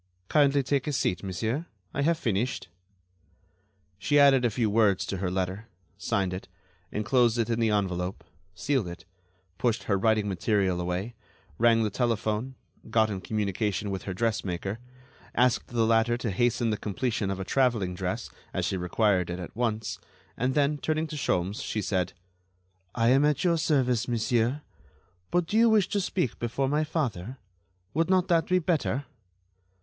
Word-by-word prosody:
"Kindly 140 Hz, -2 st, +4 dB
take 140 Hz, +1 st, 0 dB
a 150 Hz, -, -1 dB
seat, 90 Hz, -8 st, 0 dB
monsieur; 110 Hz, -, -3 dB, 0.3 s
I 140 Hz, -, -1 dB
have 165 Hz, +3 st, +2 dB
finished." 115 Hz, -, -1 dB, 1.3 s
She 145 Hz, +9 st, +2 dB
added 140 Hz, -3 st, +6 dB
a 120 Hz, -, +3 dB
few 115 Hz, +1 st, 0 dB
words 105 Hz, -3 st, +3 dB
to 95 Hz, -, -3 dB
her 90 Hz, 0 st, -1 dB
letter, 95 Hz, +4 st, -3 dB, 0.3 s
signed 95 Hz, -1 st, -1 dB
it, 90 Hz, -, -6 dB, 0.4 s
enclosed 115 Hz, +3 st, +2 dB
it 115 Hz, 0 st, 0 dB
in 115 Hz, -, 0 dB
the 115 Hz, -1 st, +2 dB
envelope, 95 Hz, -3 st, -1 dB, 0.3 s
sealed 130 Hz, +2 st, 0 dB
it, 85 Hz, -1 st, -9 dB, 0.5 s
pushed 120 Hz, -2 st, +1 dB
her 100 Hz, -2 st, 0 dB
writing 110 Hz, 0 st, +2 dB
material 95 Hz, -1 st, +1 dB
away, 90 Hz, +6 st, -3 dB, 0.5 s
rang 115 Hz, -1 st, +4 dB
the 105 Hz, -, -1 dB
telephone, 115 Hz, +2 st, -1 dB, 0.3 s
got 110 Hz, -1 st, +3 dB
in 95 Hz, -2 st, -4 dB
communication 105 Hz, 0 st, -1 dB
with 95 Hz, -1 st, -4 dB
her 95 Hz, -, -3 dB
dressmaker, 100 Hz, -2 st, -2 dB, 0.6 s
asked 125 Hz, 0 st, +2 dB
the 115 Hz, -2 st, +1 dB
latter 115 Hz, +1 st, +3 dB
to 120 Hz, -3 st, -2 dB
hasten 120 Hz, +2 st, +1 dB
the 105 Hz, -, -1 dB
completion 110 Hz, 0 st, -2 dB
of 95 Hz, -1 st, -3 dB
a 95 Hz, -, -4 dB
traveling 115 Hz, -9 st, +1 dB
dress, 90 Hz, 0 st, -4 dB, 0.2 s
as -, -, 0 dB
she 95 Hz, -, -1 dB
required 90 Hz, 0 st, +1 dB
it 90 Hz, -, -3 dB
at 90 Hz, +2 st, -8 dB
once, 110 Hz, -2 st, -2 dB, 0.4 s
and 130 Hz, +2 st, -1 dB
then, 145 Hz, 0 st, +2 dB
turning 155 Hz, +1 st, 0 dB
to 155 Hz, -, -7 dB
Sholmes, 100 Hz, -7 st, -1 dB
she 110 Hz, -, -3 dB
said: 95 Hz, -3 st, -1 dB, 0.8 s
"I 115 Hz, 0 st, +3 dB
am 135 Hz, +3 st, +5 dB
at 150 Hz, -1 st, +2 dB
your 170 Hz, -2 st, +2 dB
service, 125 Hz, -7 st, +1 dB
monsieur. 120 Hz, +3 st, 0 dB, 0.7 s
But 175 Hz, -1 st, +1 dB
do 210 Hz, -, -1 dB
you 230 Hz, +1 st, +6 dB
wish 215 Hz, -4 st, +3 dB
to 205 Hz, -, 0 dB
speak 180 Hz, -, -2 dB
before 120 Hz, +3 st, -1 dB
my 150 Hz, +3 st, +1 dB
father? 130 Hz, -, -3 dB, 0.6 s
Would 165 Hz, +3 st, +1 dB
not 185 Hz, 0 st, +3 dB
that 165 Hz, -2 st, +3 dB
be 185 Hz, -, +3 dB
better?" 155 Hz, -5 st, 0 dB
115 Hz, 165 wpm, -27 LUFS, 100-135 Hz, 1.3 s, added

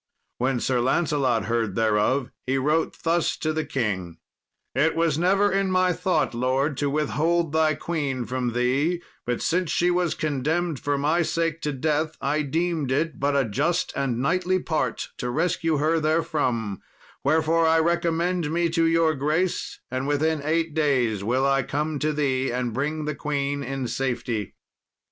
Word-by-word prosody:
When 130 Hz, 0 st, +1 dB
Sir 125 Hz, +1 st, +1 dB
Lancelot 130 Hz, -, +1 dB
heard 115 Hz, -3 st, -1 dB
thereof, 115 Hz, +4 st, +1 dB, 0.2 s
he 135 Hz, +1 st, +1 dB
wrote 150 Hz, +5 st, 0 dB
thus 170 Hz, 0 st, +1 dB
to 155 Hz, 0 st, -1 dB
the 155 Hz, 0 st, -1 dB
king: 95 Hz, -, -2 dB, 0.6 s
"It 155 Hz, +5 st, +2 dB
was 165 Hz, -2 st, +1 dB
never 195 Hz, +3 st, +3 dB
in 195 Hz, 0 st, +1 dB
my 185 Hz, -1 st, +3 dB
thought, 180 Hz, -4 st, 0 dB
lord, 130 Hz, +4 st, 0 dB
to 145 Hz, 0 st, 0 dB
withhold 155 Hz, +3 st, 0 dB
thy 160 Hz, -1 st, +3 dB
queen 140 Hz, -7 st, -2 dB
from 125 Hz, -1 st, -2 dB
thee; 140 Hz, +8 st, +1 dB, 0.2 s
but 120 Hz, -1 st, -1 dB
since 175 Hz, 0 st, +1 dB
she 175 Hz, +2 st, +2 dB
was 175 Hz, -2 st, +1 dB
condemned 155 Hz, +2 st, -1 dB
for 145 Hz, 0 st, -1 dB
my 155 Hz, +5 st, +2 dB
sake 165 Hz, 0 st, -1 dB
to 150 Hz, -, -1 dB
death, 155 Hz, +3 st, -1 dB
I 150 Hz, +2 st, 0 dB
deemed 155 Hz, -1 st, -1 dB
it 155 Hz, +2 st, 0 dB
but 140 Hz, +1 st, +1 dB
a 140 Hz, -2 st, +3 dB
just 150 Hz, -, 0 dB
and 130 Hz, -4 st, -1 dB
knightly 185 Hz, +6 st, +1 dB
part 160 Hz, -3 st, -2 dB
to 125 Hz, -, -2 dB
rescue 165 Hz, +2 st, 0 dB
her 160 Hz, +3 st, +2 dB
therefrom; 145 Hz, -, 0 dB, 0.4 s
wherefore 160 Hz, +3 st, +3 dB
I 160 Hz, 0 st, +4 dB
recommend 170 Hz, 0 st, +1 dB
me 170 Hz, +1 st, +1 dB
to 165 Hz, 0 st, +2 dB
your 165 Hz, -1 st, +3 dB
grace, 155 Hz, +6 st, -1 dB
and 130 Hz, +1 st, -2 dB
within 150 Hz, +1 st, +1 dB
eight 160 Hz, +1 st, 0 dB
days 130 Hz, -10 st, +1 dB
will 125 Hz, +5 st, +1 dB
I 135 Hz, 0 st, +3 dB
come 150 Hz, +3 st, -2 dB
to 155 Hz, +1 st, +1 dB
thee 135 Hz, -3 st, 0 dB
and 125 Hz, -1 st, -2 dB
bring 150 Hz, +5 st, -2 dB
the 150 Hz, -, -1 dB
queen 140 Hz, -1 st, -2 dB
in 135 Hz, -2 st, -3 dB
safety." 120 Hz, -3 st, -2 dB
150 Hz, 165 wpm, -25 LUFS, 130-165 Hz, 0.6 s, I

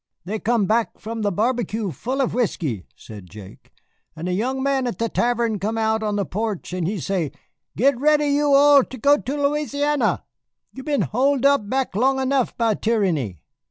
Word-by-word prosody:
"They 215 Hz, +4 st, -3 dB
come 225 Hz, -1 st, +1 dB
back 225 Hz, +3 st, 0 dB
from 225 Hz, +1 st, -6 dB
the 205 Hz, -1 st, 0 dB
barbecue 220 Hz, -1 st, -1 dB
full 255 Hz, -, -3 dB
of 260 Hz, -, 0 dB
whiskey," 160 Hz, -, -2 dB
said 100 Hz, -5 st, -12 dB
Jake, 100 Hz, -1 st, -13 dB, 0.4 s
"and 165 Hz, +2 st, -5 dB
a 180 Hz, -, -1 dB
young 260 Hz, +7 st, -1 dB
man 270 Hz, -2 st, +1 dB
at 240 Hz, -, -4 dB
the 230 Hz, 0 st, -1 dB
tavern 235 Hz, -3 st, 0 dB
come 215 Hz, +4 st, -2 dB
out 220 Hz, 0 st, +1 dB
on 210 Hz, -1 st, -1 dB
the 200 Hz, -1 st, 0 dB
porch 210 Hz, -2 st, -4 dB
and 180 Hz, -3 st, -1 dB
he 200 Hz, +1 st, -2 dB
say, 175 Hz, -4 st, -2 dB, 0.5 s
'Get 260 Hz, +2 st, +3 dB
ready 300 Hz, +1 st, +3 dB
you 290 Hz, 0 st, +2 dB
all 280 Hz, 0 st, +7 dB
to 260 Hz, -, -9 dB
go 285 Hz, +5 st, +4 dB
to 275 Hz, 0 st, -4 dB
Louisiana! 295 Hz, -1 st, 0 dB, 0.5 s
You 265 Hz, -, -8 dB
been 285 Hz, 0 st, 0 dB
hole 275 Hz, +5 st, +1 dB
back 265 Hz, -3 st, +1 dB
long 265 Hz, +5 st, +2 dB
enough 265 Hz, -1 st, 0 dB
by 230 Hz, -2 st, +2 dB
tyranny. 175 Hz, -, -1 dB
230 Hz, 185 wpm, -22 LUFS, 200-270 Hz, 0.5 s, all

